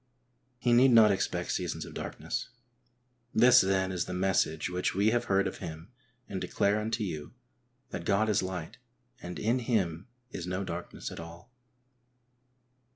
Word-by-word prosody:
He 120 -1 +2
need 125 +3 +6
not 115 -3 +7
expect 95 -1 -1
seasons - - -2
of - - -10
darkness. - - -4 0.9
This, 125 +2 +7
then, 95 0 +1
is 90 -2 -1
the 90 - -5
message 90 -4 +1
which 90 0 -1
we 100 +3 +3
have 120 +1 +1
heard 95 0 +2
of - - -4
him 80 +1 -8 0.4
and 95 -2 -4
declare 100 +1 +1
unto 110 +1 -2
you, 75 -6 -5 0.6
that - - -5
God 105 +3 +2
is 105 -3 +2
light, 95 -1 -5 0.4
and 90 0 -6
in 115 +4 +1
Him 100 -7 -1 0.2
is 90 - -5
no 90 +2 -2
darkness 90 -2 -6
at - - -8
all. 85 +8 -11
95 Hz, 155 wpm, -30 LUFS, 90-110 Hz, 0.9 s, not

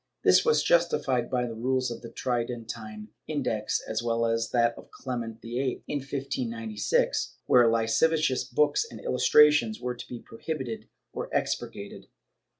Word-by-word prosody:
This - - +6
was 465 -1 +3
justified 135 -8 +2
by 125 -1 0
the 115 - -5
rules 130 +2 0
of 115 - -6
the 115 - -8
Tridentine 115 -3 -4 0.2
Index 125 -8 -1
as 110 0 -2
well 115 0 0
as 115 0 0
of - - -17
that 120 -1 +3
of - - -13
Clement 115 -4 -5
VHI, 125 +2 -2
in 145 - -1
1596, 115 -6 -1
where 120 -2 +6
lascivious 130 +5 +2
books 150 - +2
and - - -10
illustrations 150 -7 +4
were 125 0 -3
to 120 - -10
be 120 - -7
prohibited 125 -1 -6 0.2
or - - -4
expurgated. - - -3
120 Hz, 150 wpm, -27 LUFS, 115-130 Hz, 0.2 s, This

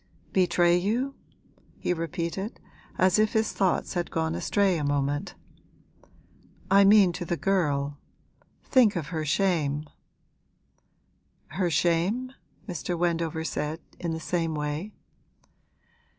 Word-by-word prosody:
'Betray 175 -2 +3
you?' 235 +9 -1 0.6
he - - -1
repeated, 170 +4 -4 0.4
as 185 +2 +4
if 215 0 +2
his 220 -1 +1
thoughts 190 -2 0
had 175 -2 -2
gone 160 0 -1
astray 195 -3 +1
a - - -2
moment. 145 0 -1 1.4
'I 200 0 +7
mean 200 -2 +6
to 175 - -5
the 175 0 -2
girl. 145 -7 0 0.6
Think 240 -6 +4
of 160 -5 -3
her 160 -2 -2
shame!' 155 -3 0 1.6
'Her 180 +2 -1
shame?' 175 - +1 0.4
Mr. 175 -1 -3
Wendover 165 -2 -1
said, 150 0 -3 0.2
in 170 -2 -2
the 160 - -3
same 165 -1 -1
way. 150 +7 -3
175 Hz, 115 wpm, -27 LUFS, 160-195 Hz, 1.6 s, I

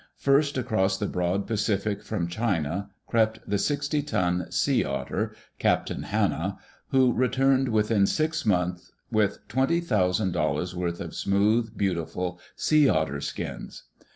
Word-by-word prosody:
First 140 0 +2
across 105 -6 +1
the 105 - -2
broad 90 +1 -1
Pacific, 105 -2 -1
from 90 -6 -2
China, 95 -2 -1 0.2
crept 110 -1 0
the 100 0 0
sixty 145 +4 0
ton 90 - 0
Sea - - +2
Otter, 70 0 -2 0.3
Captain - - +1
Hanna, - - -1 0.3
who 130 -2 +3
returned 135 +1 +2
within 105 -2 +3
six 155 +1 0
months 90 -3 0 0.2
with 110 -3 0
twenty 135 +6 +1
thousand 100 - +1
dol 75 -3 0
lars' 90 +4 -3
worth 85 -1 -2
of - - -6
smooth, 105 +3 +1
beautiful 90 -1 -2 0.2
sea 150 -3 +4
otter 80 -4 0
skins. - - -6
105 Hz, 135 wpm, -26 LUFS, 90-125 Hz, 0.3 s, sea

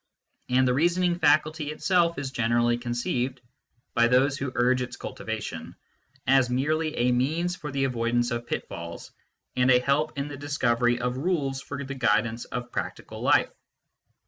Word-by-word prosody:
And 130 +1 +3
the 125 - +3
reasoning 175 +4 +2
faculty 155 0 +2
itself 170 +2 +1
is 135 -2 -4
generally 120 -1 +2
conceived, 120 +1 -2 0.5
by 120 0 +4
those 130 +3 +3
who 140 -2 -3
urge 125 +1 +3
its 125 - -4
cultivation, - - -6 0.5
as 135 -1 +4
merely 155 +5 0
a 125 +1 +2
means 160 +8 0
for 150 -5 -7
the 135 0 -1
avoid 120 -2 0
ance 120 0 +1
of 120 0 -3
pitfalls 85 0 -6 0.4
and 125 +1 +3
a 125 -1 +6
help 145 +4 0
in 140 +1 -2
the 145 -1 -7
discovery 120 -4 +1
of 125 +1 -2
rules 140 -4 -1
for 140 0 -6
the 135 0 -5
guidance 115 -2 +1
of 120 0 -6
practical - - -5
life. - - +3
130 Hz, 160 wpm, -26 LUFS, 120-145 Hz, 0.5 s, a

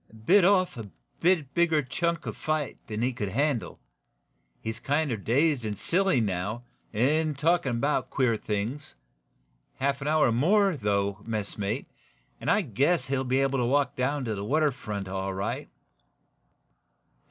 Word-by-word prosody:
"Bit 195 - +6
off 185 -5 +3
a - - -6
little 105 -3 -8 0.3
bit 160 -6 +2
bigger 165 -3 +3
chunk 170 +6 -1
of - - -4
fight 155 -2 -2
than 110 +1 -3
he 125 +1 +1
could 105 -4 -3
handle. 135 +2 -1 0.8
He's 110 0 -5
kinder 145 +1 0
dazed 130 +6 +1
and 105 -2 -3
silly, 185 - +2
now, 105 +2 -2 0.3
and 150 +6 +1
talkin' 160 -4 +2
about 140 +6 0
queer 125 -4 +2
things. 110 - -3 0.8
Half 140 +1 -1
an 140 - -3
hour 155 -5 +3
more, 190 - +3
though, 100 -4 0
messmate, 105 +1 -3 0.5
and - - -3
I 210 - +4
guess 140 - +1
he'll 135 -1 0
be 130 +1 +1
able 135 -1 +1
to 120 - +1
walk 135 +1 +1
down 135 +2 -1
to 110 - -1
the 100 -1 -4
water 150 +6 +2
front 105 -6 -5
all 95 0 -3
right." 95 +1 -3
130 Hz, 155 wpm, -27 LUFS, 110-155 Hz, 0.8 s, Bit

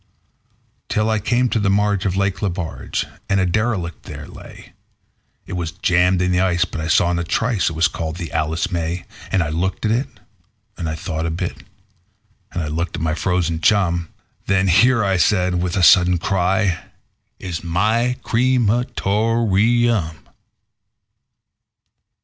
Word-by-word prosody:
Till 110 +1 +1
I 110 - +1
came 120 +4 +1
to 115 - 0
the 100 -2 +1
marge 100 -1 +1
of 95 - -1
Lake 95 -1 0
Lebarge, 90 -5 -3 0.2
and 100 - +2
a 95 - +2
derelict 95 -3 -1
there - - -8
lay; - - -13 0.7
It - - -8
was 85 -3 -3
jammed 90 0 +2
in 90 - +1
the 90 - +2
ice, 90 -1 +2
but 85 - -6
I 80 - -3
saw 85 +1 +3
in 85 - 0
a - - -1
trice 105 +3 0
it - - -6
was 80 +2 +3
called 80 -1 -5
the 85 -4 -6
"Alice 80 +3 -1
May". 85 0 -3 0.3
And 95 - +2
I 75 - -3
looked 90 +7 -2
at 105 - +2
it, 125 +5 0 0.7
and 80 -2 -4
I 80 - -3
thought 80 -1 -3
a - - -1
bit, 85 +2 -3 1.0
and 90 - -3
I - - -3
looked 85 +3 -3
at - - -5
my 80 -1 0
frozen 85 -1 -1
chum; 85 -3 +2 0.4
Then 95 0 +2
"Here", 100 -1 +3
said 90 -1 +2
I, - - 0
with 90 +1 -1
a 90 - +1
sudden 90 0 +6
cry, 95 +1 +1 0.6
"is 90 -3 -5
my 110 +9 +1
cre 125 +3 +2
ma 120 +1 +2
tor 110 +1 +1
eum." 110 - +1
90 Hz, 170 wpm, -20 LUFS, 85-105 Hz, 1.0 s, sudden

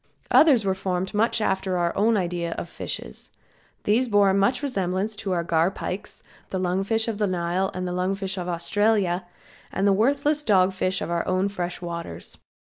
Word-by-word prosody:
Others 270 -9 +6
were 190 - +2
formed 190 0 -2
much 225 +2 +2
after 190 -2 0
our 170 -1 0
own 220 +2 +3
ideas 175 -2 -2
of - - -4
fishes. - - -5 0.5
These 235 +5 +2
bore 205 -3 +4
much 200 +8 +2
resemblance 200 -4 -1
to 195 - -3
our 170 -1 0
garpikes, 170 +3 -1 0.3
the 190 - -2
lung 185 +1 0
fish 225 +3 +1
of 220 -2 -3
the 210 - +2
Nile 180 +1 0
and 185 0 -3
the 180 - -3
lung 185 +2 0
fish 195 -1 -2
of 180 -2 -4
Australia, 185 +1 +1 0.4
and 195 - -1
the 200 - +5
worthless 285 +8 +2
dog 190 -7 +3
fish 185 0 -1
of - - -4
our 170 -1 0
own 185 +2 +1
fresh 180 -2 -4
waters. 170 -1 -6
190 Hz, 185 wpm, -24 LUFS, 180-210 Hz, 0.5 s, Others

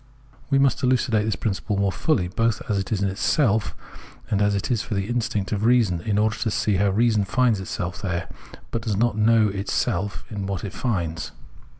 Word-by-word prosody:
We 140 - +3
must 135 -2 +3
elucidate 125 -4 +2
this 110 -3 0
principle 100 +2 -2
more 100 -1 +1
fully, 105 - 0
both 115 +4 0
as 100 -2 0
it 95 - -5
is 100 -3 0
in 100 - +1
itself 110 - +1 0.6
and 105 -1 +2
as 100 0 +2
it 100 +5 -2
is 115 -4 +1
for 110 - -4
the 100 0 -1
instinct 110 -4 -1
of 105 -1 -1
reason, 115 -8 +3
in 105 +2 -1
order 105 +1 +1
to 110 - -1
see 105 -1 +1
how 100 +2 +3
reason 110 +1 +2
finds 115 +1 +2
itself 90 -1 -4
there, 90 -3 -2 0.4
but 115 - -2
does 110 -3 -2
not 120 +1 +2
know 110 0 +4
itself 100 -1 -2
in 100 -2 -4
what 100 -2 -3
it 100 - -5
finds. 85 -9 -2
105 Hz, 205 wpm, -24 LUFS, 100-115 Hz, 0.6 s, know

